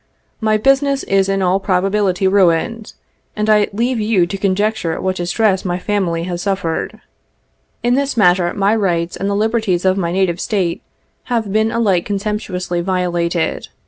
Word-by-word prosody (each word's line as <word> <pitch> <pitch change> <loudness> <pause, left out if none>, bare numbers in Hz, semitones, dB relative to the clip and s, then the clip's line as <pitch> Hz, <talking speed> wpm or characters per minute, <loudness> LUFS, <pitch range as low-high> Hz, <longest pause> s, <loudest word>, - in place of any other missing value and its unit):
My 215 -1 +2
business 275 +4 +2
is 195 0 +1
in 195 -1 0
all 185 +1 +2
probability 195 0 +1
ruined, 195 +4 +1 0.4
and 210 0 -1
I 210 -1 +4
leave 235 +4 -1
you 210 -4 +2
to 185 - -5
conjecture 200 -3 0
what 185 0 -2
distress 190 +2 +1
my 175 -1 -2
family 180 -4 -1
has 175 0 -4
suffered. 190 -5 -2 0.8
In 240 +1 +2
this 275 -1 0
matter 180 -3 +3
my 200 +2 +2
rights 175 -5 -1
and 195 - -2
the 200 - 0
liberties 215 -4 0
of 190 +1 +3
my 170 -2 -1
native 180 -2 0
State 185 -6 -1 0.4
have 225 -5 -2
been 220 +1 +2
alike 205 -7 +1
contemptuously 200 -4 -3
violated. 175 -2 -1
195 Hz, 155 wpm, -17 LUFS, 180-215 Hz, 0.8 s, I